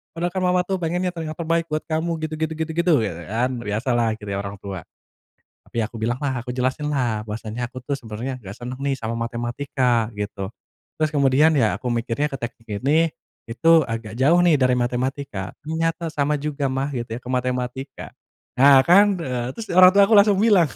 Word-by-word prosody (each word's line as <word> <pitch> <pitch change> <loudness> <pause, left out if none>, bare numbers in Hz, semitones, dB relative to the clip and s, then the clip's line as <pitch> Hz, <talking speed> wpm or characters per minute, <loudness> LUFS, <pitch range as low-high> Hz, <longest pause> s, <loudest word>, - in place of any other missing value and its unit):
padahal 175 +1 -1
kan 185 - 0
mama 180 0 +3
tuh 195 - 0
pengennya 180 +2 -1
telinga 160 -2 -4
terbaik 165 0 0
buat 155 - -1
kamu 160 +1 -1 0.2
gitu 155 - -8
gitu 160 0 0
gitu 160 0 -2
gitu 170 +1 +2
gitu-", - - 0
biasa 85 -5 -4
kan, 120 +3 0
biasalah 115 +3 0
gitu 105 - -8
ya 100 - -2
orang 100 0 -6
tua. 95 -4 -7 0.9
Tapi - - -6
aku 115 +2 -7
bilang 120 +3 -1
lah, 135 -4 -1
aku 125 - -4
jelasin 130 +4 -1
lah 120 -6 -1
bahwasanya 110 +2 -4
aku 130 - -8
tuh 140 0 -2
sebenarnya 120 +1 -6
enggak 95 +1 -8
seneng 125 +1 -5
nih 140 0 0
sama 115 +1 -3
matematika, 120 0 -1
gitu. 100 -2 -4 0.5
Terus 155 - +3
kemudian 140 +2 +4
ya 115 -6 +2
aku 125 - -3
mikirnya 120 +5 -1
ke - - -2
teknik 115 -1 -7 0.2
ini, 160 +4 +4 0.4
itu 125 +8 +1 0.2
agak 115 -1 -5
jauh 145 +6 +4
nih 170 -3 +5
dari 130 -1 +4
matematika. 125 -4 -2
Ternyata 165 +1 -1
sama 150 0 +1
juga 145 -1 -2
mah 135 +1 -1
gitu 120 -3 -4
ya - - -8
ke 125 - -8
matematika. 125 +1 -3 0.5
Nah 135 0 +8
kan, 200 +2 +5
eee, 125 -5 -3
terus 225 - -6
orang 185 0 +9
tua 200 0 +7
aku 225 - +4
langsung 200 -1 +5
bilang. 205 -6 +5
130 Hz, 200 wpm, -22 LUFS, 120-160 Hz, 0.9 s, orang